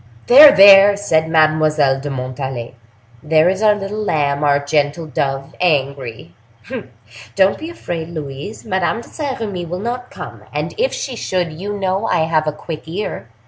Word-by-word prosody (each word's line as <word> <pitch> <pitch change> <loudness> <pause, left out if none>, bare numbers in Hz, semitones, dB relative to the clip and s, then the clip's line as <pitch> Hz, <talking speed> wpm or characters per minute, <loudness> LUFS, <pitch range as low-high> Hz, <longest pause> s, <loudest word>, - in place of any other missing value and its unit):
"There! 285 +4 +9
there!" 200 0 +7
said 160 -6 0
Mademoiselle 155 -3 +2
de 145 +2 -6
Montalais; 130 -2 -5 0.5
"there 155 +1 +2
is 190 +2 -2
our 210 -1 +4
little 205 +1 -5
lamb, 145 -6 -1
our 145 -1 +3
gentle 145 +2 -1
dove, 135 -2 -3
angry! 135 - -2 1.0
Don't 190 +1 +2
be 320 - -7
afraid, 170 - -6
Louise—Madame 175 +7 -4
de - - -15
Saint 285 -4 -5
Remy 195 -6 -4
will 180 +2 -4
not 245 +5 -5
come; - - -10
and - - -4
if - - +1
she 390 - -5
should, 180 -7 -2
you 200 +6 -6
know 195 +2 -1
I - - +1
have 160 -1 0
a - - +1
quick 155 +1 -9
ear. 175 - -5
165 Hz, 160 wpm, -17 LUFS, 145-205 Hz, 1.0 s, There